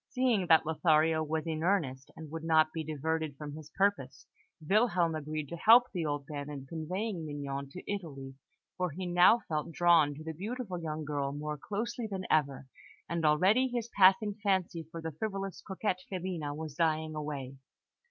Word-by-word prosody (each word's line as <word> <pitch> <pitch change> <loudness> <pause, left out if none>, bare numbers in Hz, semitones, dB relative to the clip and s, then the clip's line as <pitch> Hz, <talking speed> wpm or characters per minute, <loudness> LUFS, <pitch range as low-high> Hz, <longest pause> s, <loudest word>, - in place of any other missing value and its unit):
Seeing 245 -8 +1
that 160 -1 +6
Lothario 160 0 +3
was 155 +1 -2
in 160 -1 -3
earnest, 155 -8 0
and 155 -2 -10
would 165 0 -5
not 155 -1 +3
be 160 - -3
diverted 155 -1 -2
from 150 -1 -7
his 155 0 -10
purpose, 195 -10 0 0.4
Wilhelm 190 -5 +3
agreed 155 -1 -4
to - - -5
help 235 +7 +6
the 170 -4 -1
old 145 -1 -2
man 145 -1 -5
in 140 -2 -7
conveying 170 +5 -4
Mignon 140 -2 -5
to 180 - -9
Italy; 145 -10 -5 0.4
for 180 -1 0
he 180 +5 -6
now 180 +6 +5
felt 155 +1 -2
drawn 165 -3 +4
to 155 - -9
the 160 0 -5
beautiful 200 +1 -5
young 155 -1 -4
girl 140 -2 -2
more 150 +1 -4
closely 220 - -4
than 190 -2 -4
ever, 140 -3 +1 0.4
and 170 -1 -2
already 185 +12 +4
his 240 -2 -4
passing 200 +2 +5
fancy 185 -5 0
for 165 0 -8
the 160 - -3
frivolous 195 +3 -4
coquette, 190 -1 -2
Filina, 180 -5 -3
was 155 -1 -6
dying 155 0 0
away. 145 -3 -5
160 Hz, 175 wpm, -31 LUFS, 150-190 Hz, 0.4 s, that